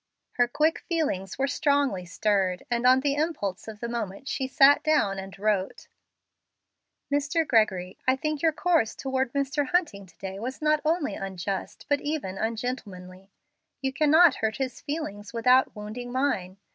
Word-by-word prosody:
Her 245 0 +2
quick 305 +6 +1
feelings 285 - -2
were 275 - +1
strongly 280 - +1
stirred, 190 -1 0
and 240 +1 +2
on 260 +1 +6
the 280 0 +1
impulse 285 - -2
of 215 -1 -9
the 235 - -2
moment 235 0 -5
she 265 -2 -2
sat 275 +1 +6
down 290 -11 +1
and 195 0 -9
wrote: 200 -2 -1 1.3
"Mr. 290 +3 +1
Gregory 190 -5 +1
I 260 - +5
think 305 +1 -3
your 325 - +4
course 320 -7 +1
toward 265 -2 -2
Mr. 280 0 0
Hunting 255 - 0
to 170 -2 -22
day 190 +2 -6
was 255 +4 -5
not 305 0 +2
only 315 -1 0
unjust, 195 0 -5
but 285 -1 +1
even 285 -11 -3
ungentlemanly. 200 -5 -5 0.5
You 265 0 -2
cannot 310 +3 +5
hurt 220 0 -1
his 260 -2 -4
feelings 245 -10 -5
without 250 +3 +3
wounding 215 +4 -7
mine. 245 -9 -1
250 Hz, 160 wpm, -26 LUFS, 200-290 Hz, 1.3 s, on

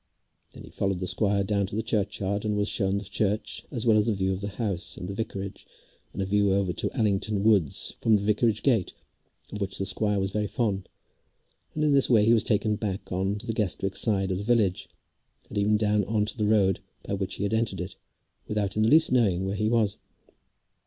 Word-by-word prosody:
Then - - -11
he - - -13
followed 95 -1 -1
the 90 - -3
squire 100 +2 +1
down 100 0 0
to 100 - -7
the 110 - -1
churchyard, 100 -2 -1
and 105 -1 -1
was 105 0 +1
shown 100 -2 0
the 100 - -4
church 105 +2 -2
as 120 -5 -3
well 110 -2 +5
as 105 +1 +2
the 115 - +2
view 95 0 0
of 95 - -5
the 100 - -3
house, 100 -3 -4
and 90 - -6
the 100 - -5
vicarage, 100 -2 -5 0.4
and 95 - -3
a - - -2
view 100 0 +2
over 95 -3 0
to - - -2
Allington 105 -2 0
woods 100 -9 +2
from 110 -1 +3
the 100 - 0
vicarage 105 +1 +1
gate, 115 -10 +2 0.6
of 105 - -6
which 95 -1 -1
the 95 - -1
squire 105 +1 +1
was 95 0 -1
very 105 +1 -1
fond, 100 -4 -2 0.9
and 155 - 0
in 150 -1 +3
this 135 -1 +4
way 110 -4 +5
he 115 - +5
was 115 - +3
taken 105 -1 +1
back 100 -2 -4
on 95 +2 0
to 105 - -9
the 115 - -2
Guestwick 95 -2 -1
side 95 -4 +1
of 90 - -1
the - - -4
village, 105 -5 +1 0.6
and 105 - -6
even 105 +1 +3
down 105 -1 +2
on 105 +1 0
to 105 - -3
the 105 -3 0
road 100 -3 +3 0.2
by - - -4
which 95 -1 -3
he - - -4
had 100 - -1
entered 110 -5 0
it, 90 +2 -6 0.5
without 105 -2 -1
in 110 - +1
the 110 - +4
least 160 +2 +5
knowing 100 -7 +2
where 95 - -2
he 105 +2 0
was. 110 -3 +1
105 Hz, 230 wpm, -27 LUFS, 95-110 Hz, 0.9 s, well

